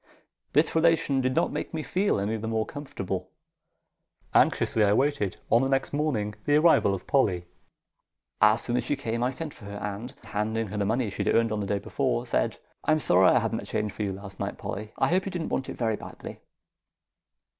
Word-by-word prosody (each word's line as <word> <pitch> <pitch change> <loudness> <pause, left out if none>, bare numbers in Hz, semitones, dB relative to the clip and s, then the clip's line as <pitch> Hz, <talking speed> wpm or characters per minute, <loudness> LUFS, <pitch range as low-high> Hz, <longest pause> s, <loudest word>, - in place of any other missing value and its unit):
This 150 +3 +3
relation 160 -4 +3
did 130 0 0
not - - +2
make - - -4
me 155 - -2
feel 190 - +1
any 105 +3 -1
the 110 0 -4
more 110 -1 0
comfortable. 140 -10 -5 1.0
Anxiously 110 - +3
I 100 0 +4
waited, 130 -6 +1
on 115 - +6
the 135 - +1
next 135 +1 0
morning, 130 -9 0
the 145 - +3
arrival 155 -11 +5
of 95 - -9
Polly. 95 -11 +2 1.0
As 105 +2 +5
soon 120 0 -1
as 125 - 0
she 145 - 0
came 115 -4 -3
I 125 - +2
sent 150 +3 -6
for 105 - -14
her, 100 0 -6
and, 105 +5 -5
handing 110 +1 -2
her 105 - -5
the 100 - 0
money 115 -1 0
she - - -2
had - - +2
earned 115 -1 +3
on 105 - -1
the 100 - -3
day 100 +1 +1
before, - - -1
said, - - 0 0.3
"I'm 155 - +3
sorry 95 - +4
I - - +5
hadn't - - 0
the - - -8
change 105 -1 -1
for - - -7
you 100 -2 -1
last 95 0 -10
night, - - -3
Polly. 105 +2 -5
I - - +2
hope 185 +2 +1
you - - -3
didn't 175 -3 -3
want 130 - -2
it - - -6
very 110 -3 0
badly." - - -9
115 Hz, 215 wpm, -27 LUFS, 105-145 Hz, 1.0 s, on